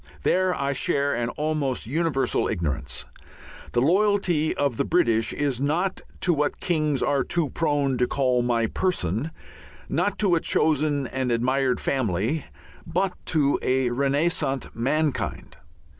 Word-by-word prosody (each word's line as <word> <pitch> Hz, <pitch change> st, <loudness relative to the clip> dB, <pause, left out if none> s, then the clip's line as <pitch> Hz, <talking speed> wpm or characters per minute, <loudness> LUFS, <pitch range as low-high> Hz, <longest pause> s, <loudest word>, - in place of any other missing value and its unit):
There 185 Hz, 0 st, +2 dB
I 140 Hz, 0 st, 0 dB
share 140 Hz, +1 st, +1 dB
an 120 Hz, 0 st, -1 dB
almost 150 Hz, -3 st, -2 dB
universal 140 Hz, -1 st, 0 dB
ignorance. 70 Hz, -, -3 dB, 0.7 s
The 120 Hz, -, +2 dB
loyalty 180 Hz, -2 st, +2 dB
of 140 Hz, -5 st, 0 dB
the -, -, +2 dB
British 115 Hz, -10 st, +2 dB
is 140 Hz, -3 st, -1 dB
not 170 Hz, +7 st, 0 dB, 0.2 s
to 175 Hz, -, +3 dB
what 150 Hz, -1 st, -1 dB
kings 155 Hz, -5 st, 0 dB
are 140 Hz, -2 st, +2 dB
too 165 Hz, -2 st, -1 dB
prone 145 Hz, -5 st, 0 dB
to 125 Hz, -, +3 dB
call 130 Hz, -3 st, +1 dB
"my 120 Hz, -1 st, +1 dB
person," 120 Hz, -, -1 dB, 0.6 s
not -, -, 0 dB
to 195 Hz, -4 st, +2 dB
a 170 Hz, -, +4 dB
chosen 150 Hz, -3 st, +1 dB
and 130 Hz, 0 st, -2 dB
admired 130 Hz, +2 st, +1 dB
family, 125 Hz, -, -1 dB, 0.4 s
but 180 Hz, +3 st, 0 dB
to 145 Hz, -3 st, +2 dB
a 130 Hz, -1 st, +1 dB
renascent 140 Hz, +1 st, 0 dB
mankind. 145 Hz, +5 st, -1 dB
140 Hz, 135 wpm, -25 LUFS, 125-160 Hz, 0.7 s, a